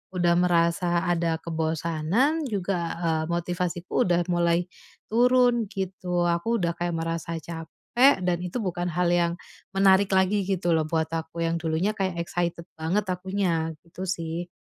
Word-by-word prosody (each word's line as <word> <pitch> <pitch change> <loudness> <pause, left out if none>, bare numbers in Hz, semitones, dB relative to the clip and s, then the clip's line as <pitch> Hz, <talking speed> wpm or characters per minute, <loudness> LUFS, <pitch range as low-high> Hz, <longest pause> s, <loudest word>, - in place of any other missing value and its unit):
udah 175 -1 +3
merasa 175 0 +2
ada 170 -2 +1
kebosanan 165 - 0
juga, 195 -3 -1 0.2
eee, 160 -1 +1
motivasiku 175 +1 -1
udah 175 0 +3
mulai 170 0 +2 0.5
turun 245 -2 +4
gitu. 185 -3 -2
Aku 175 +7 +1
udah 170 -3 0
kayak 175 -1 -2
merasa 165 0 -3
capek 170 - +1
dan 175 -1 +2
itu 180 +6 -4
bukan 175 -1 -2
hal 180 +2 0
yang 170 -1 +2 0.4
menarik 195 0 +5
lagi 190 +2 +3
gitu 180 -3 0
loh 155 -1 +1
buat 160 -1 0
aku, 165 +1 -3
yang 165 0 0
dulunya 165 +5 0
kayak 190 -4 -2
excited 170 -1 -2
banget 180 +7 0
akunya, 180 -4 -1
gitu 185 +3 -7
sih. 170 -1 -3
175 Hz, 145 wpm, -26 LUFS, 165-190 Hz, 0.5 s, menarik